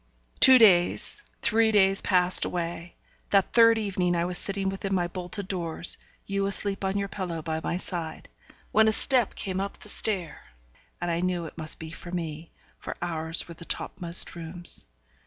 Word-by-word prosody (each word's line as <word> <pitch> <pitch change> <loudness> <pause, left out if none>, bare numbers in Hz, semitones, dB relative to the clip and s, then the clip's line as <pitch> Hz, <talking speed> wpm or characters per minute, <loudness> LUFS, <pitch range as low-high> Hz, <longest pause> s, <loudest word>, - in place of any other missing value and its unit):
Two 260 -1 +9
days, 185 -7 +3 0.2
three 225 0 +2
days 195 -2 +5
passed 180 -1 +5
away. 170 0 -5 0.3
That 195 -2 +1
third 230 -1 +6
evening 185 -4 -1
I 170 0 0
was 180 0 -2
sitting 195 -1 -1
within 195 0 -3
my 175 -1 0
bolted 185 +3 -6
doors 170 -3 -2 0.3
you 195 0 -2
asleep 200 0 0
on 190 +1 -1
your 200 0 -2
pillow 180 -5 -6
by 160 0 -4
my 170 - -2
side 170 -4 -6 0.4
when 220 0 +4
a 220 - +2
step 250 -1 +1
came 190 -1 -4
up 200 +1 -5
the 210 - -11
stair, 190 -7 -4 0.6
and 175 0 -3
I 165 - -1
knew 180 -1 -2
it 160 - -10
must 155 -2 +2
be 160 0 -9
for 175 - -11
me; 165 -2 -6 0.3
for - - -8
ours 165 -1 -3
were 170 - -9
the 170 - -12
top 180 - -4
most 170 0 +3
rooms. 170 - +1
180 Hz, 180 wpm, -26 LUFS, 170-200 Hz, 0.6 s, Two